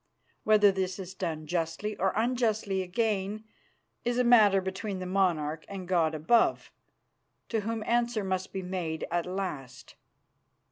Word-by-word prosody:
Whether 210 -2 +6
this 190 -1 -2
is 190 -1 -7
done 165 -5 -4
justly 170 +5 -2
or 190 +1 +1
unjustly 220 -4 0
again 205 +2 -1 0.6
is 240 0 0
a 250 - +3
matter 215 -5 +6
between 190 +2 -4
that 185 - -5
monarch 165 -5 0
and 190 -2 -6
God 165 -3 +2
above, 195 +10 +2 0.8
to 225 - 0
Whom 220 +1 -3
answer 235 -2 +1
must 185 -1 -2
be 190 -1 -4
made 175 -3 -3
at 175 0 0
last. 155 -10 -5
190 Hz, 140 wpm, -29 LUFS, 180-215 Hz, 0.8 s, Whether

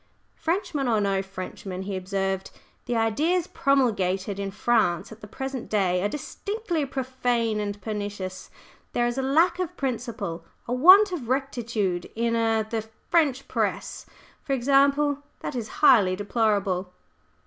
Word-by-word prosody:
"Frenchman 325 -6 -1
or 225 -3 +2
no 195 -1 +1
Frenchman," 190 0 -7
he 195 0 -4
observed, 190 0 -2 0.4
"the 245 - 0
ideas 300 +11 +1
promulgated 200 -8 +1
in 200 0 -2
France 205 -3 +1
at 220 +1 -12
the 210 - -9
present 265 +2 -5
day 185 -4 +1
are 205 - +1
distinctly 350 - -3
profane 245 -4 -1
and 205 -1 -3
pernicious. 205 -3 -5 0.4
There 240 - +2
is 240 +2 -1
a - - +1
lack 330 +7 +3
of 365 -4 -3
principle 235 - -3 0.2
a 240 - -1
want 370 +10 +8
of 280 -10 -5
rectitude 235 -9 -1
in 230 +1 0
er 225 -1 +2
the 220 +1 -3 0.3
French 285 -6 +2
Press, - - -2 0.3
for 275 - -2
example, 280 +2 +3 0.2
that - - -4
is 235 -4 -3 0.2
highly 205 -10 +6
deplorable." 200 -3 0
230 Hz, 140 wpm, -26 LUFS, 200-275 Hz, 0.4 s, want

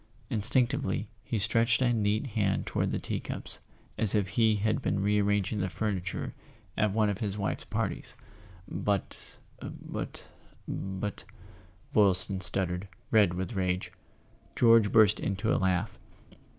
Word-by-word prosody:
Instinctively, 120 +4 +1 0.2
he 115 - 0
stretched 115 +2 +3
a 125 -2 +3
neat 105 +1 +1
hand 100 -3 +1
toward - - -1
the - - -1
tea - - -3
cups, - - -4 0.4
as 110 -1 +3
if 100 -3 +1
he 110 -1 +3
had 110 +5 0
been 105 - 0
re¬ 105 +1 +2
arranging 105 +1 +1
the 95 -1 -1
furniture 100 -2 -3 0.4
at 105 -1 +2
one 105 +1 +2
of 100 -1 -1
his 100 -2 -2
wife's 100 - -2
parties. - - -3 0.5
"But—but—but 100 0 -5 0.3
" 90 0 -28
Boylston 95 -2 +3
stuttered, 95 0 -1 0.2
red 105 -6 +4
with 95 +5 -3
rage. 90 -2 -1 0.6
George 115 -3 +5
burst 110 -4 +5
into 100 +3 0
a - - +2
laugh. 90 -2 0
105 Hz, 135 wpm, -29 LUFS, 95-110 Hz, 0.6 s, George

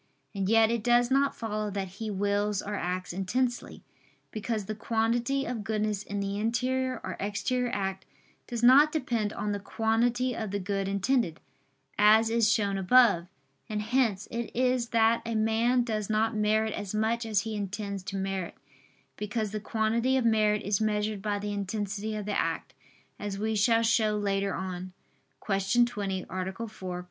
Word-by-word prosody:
And 195 -2 -1
yet 225 0 +5
it 235 -2 -1
does 240 +1 +3
not 275 +1 +3
follow 215 -2 -3
that 195 -1 -3
he 220 -1 -3
wills 205 0 0
or 210 - -5
acts 180 -2 -3
intensely; 240 +7 -2 0.5
because 215 -1 -3
the 215 - -3
quantity 235 +5 0
of 235 -3 -4
goodness 215 -1 -1
in 205 -1 -5
the 200 +1 -2
interior 255 +3 0
or 185 -1 -4
exterior 245 +5 -1
act 195 -1 -3 0.4
does 240 -1 -4
not 280 +5 +7
depend 235 -9 -1
on 210 -1 -3
the 205 - -2
quantity 235 +4 0
of 220 -2 -3
the 205 - -2
good 195 0 -2
intended, 200 -2 0 0.6
as 220 +2 +6
is 230 -1 +3
shown 200 -3 +1
above. 195 -4 +5 0.4
And 210 -1 -2
hence 220 -4 +1
it 235 0 -3
is 250 -1 +1
that 230 0 +3
a 230 -1 -3
man 225 +3 +2
does 215 -3 -3
not 220 +1 +1
merit 215 +1 +1
as 205 0 -5
much 225 +2 +1
as 215 -3 +1
he 220 0 -4
intends 200 0 -4
to 195 - -5
merit: 190 -2 -3 0.6
because 210 0 -2
the 215 - -3
quantity 230 +4 +1
of 255 - 0
merit 215 -2 +3
is 200 +1 0
measured 210 -1 0
by 205 0 -1
the 205 0 -4
intensity 205 +1 -3
of 210 -1 -4
the 210 - -2
act, 165 -5 -2 0.5
as 205 -1 -4
we 220 +2 -1
shall 225 +2 +3
show 220 -2 +2
later 200 -1 0
on 185 0 -5 0.5
(Q. 195 +4 +3
20, 200 -5 -3
A. 185 0 -3
4; 230 +4 -5
Q. - - -10
215 Hz, 175 wpm, -28 LUFS, 200-230 Hz, 0.6 s, not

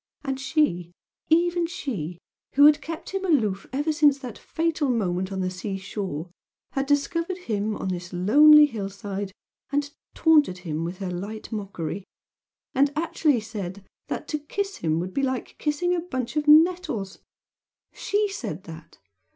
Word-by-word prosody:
And 270 -2 -2
she 180 - 0 0.4
even 345 +1 +3
she 205 - -4 0.4
who 285 +1 +8
had 300 0 +6
kept 325 0 -6
him 390 0 -2
aloof 220 - +1
ever 290 +4 0
since 295 -2 +4
that 250 -5 -8
fatal 325 -3 -1
moment 190 -5 0
on 190 -1 -2
the 185 0 -1
seashore, 190 -3 -5 0.4
had 270 0 -1
discovered 335 +5 0
him 215 - -2
on 190 - -3
this 180 -1 -4
lonely 295 +12 +7
hill 215 -8 -4
side, 200 -1 -5 0.4
and 285 +1 +2
had 285 - -14 0.2
taunted 300 - +4
him 155 0 -2
with 175 +2 -4
her 190 -2 -4
light 200 +5 -6
mockery 195 -4 -4 0.7
and 280 +2 +3
actually 305 -5 +1
said 200 -3 -6 0.2
that - - -4
"to 300 - -1
kiss 395 +7 -3
him 160 0 0
would 180 +2 -4
be 275 - 0
like 260 -2 -2
kissing 310 +4 0
a 355 - +1
bunch 260 -7 -4
of 300 0 0
nettles!" 305 - +4 0.7
SHE 415 +1 0
said 210 - -5
that! 160 -2 -11
250 Hz, 160 wpm, -25 LUFS, 190-305 Hz, 0.7 s, who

